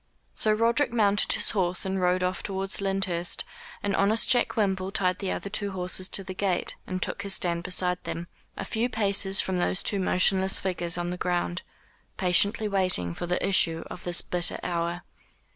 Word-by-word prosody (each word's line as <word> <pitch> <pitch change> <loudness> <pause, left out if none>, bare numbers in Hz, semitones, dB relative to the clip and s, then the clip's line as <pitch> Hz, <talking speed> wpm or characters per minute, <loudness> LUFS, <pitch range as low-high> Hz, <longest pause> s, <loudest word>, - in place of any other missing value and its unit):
So 215 - +1
Roderick 230 +6 +2
mounted 205 -3 +2
his - - 0
horse 185 -3 -1
and 190 0 -2
rode 180 0 +1
off 180 +1 -1
towards 195 0 -3
Lyndhurst, 195 -3 0 0.4
and 200 - 0
honest 215 +3 +2
Jack 245 -2 +2
Wimble 190 -3 0
tied 185 -3 0
the 195 - -3
other - - -4
two 200 -1 -2
horses 185 0 0
to 195 - +3
the 185 0 -7
gate, 185 -2 -1
and 185 0 -3
took 190 - -3
his 200 -1 0
stand 170 -1 +1
beside 180 0 -1
them, 170 - -4 0.3
a 195 - -4
few 230 +4 -1
paces 200 -3 +2
from 185 -1 -1
those 185 +2 -1
two 200 - +3
motionless 190 +1 +3
figures 175 -2 -1
on 175 0 -3
the 180 - -4
ground, 175 0 -2 0.6
patiently 200 +4 +2
waiting 185 - +1
for 175 - -5
the 180 - -1
issue 165 -4 +2
of 175 - -8
this 175 -1 +2
bitter 175 -1 +2
hour. 170 0 -2
190 Hz, 185 wpm, -26 LUFS, 180-200 Hz, 0.6 s, to